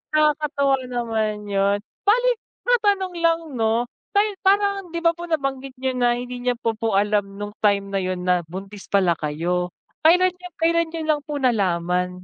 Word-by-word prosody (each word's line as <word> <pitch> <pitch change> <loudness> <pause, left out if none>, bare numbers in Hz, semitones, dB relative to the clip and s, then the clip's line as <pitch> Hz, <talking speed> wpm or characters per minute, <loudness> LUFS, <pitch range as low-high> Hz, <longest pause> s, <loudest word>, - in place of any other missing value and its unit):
Nakakatuwa 300 -2 +2
naman 225 -3 -1
yun, 200 0 +1 0.3
bale - - +4 0.4
matanong 405 -6 +2
lang 330 0 +3 0.2
'no, 225 +1 +1 0.6
parang 400 -1 +2
'di 335 0 -3
ba 335 - +7
po 345 +1 -8
nabanggit 275 -3 -2
niyo 260 0 -1
na 245 -1 +2
hindi 245 0 -6
niya 250 0 +1
po 230 -1 -1
po 220 -2 -1
alam 205 -1 0
nung 205 0 -5
time 200 -2 +2
na 195 - +1
yun 185 -1 -3
na 180 -1 +3
buntis 195 +2 -8
pala 185 -4 +3
kayo, 170 +4 -1 0.3
kailan 360 +3 +5
nyo 360 0 -11
kailan 335 0 +2
nyo 325 0 -5
lang 305 -2 +1
po 300 - -4
nalaman? 180 -7 +1
245 Hz, 165 wpm, -23 LUFS, 200-330 Hz, 0.6 s, ba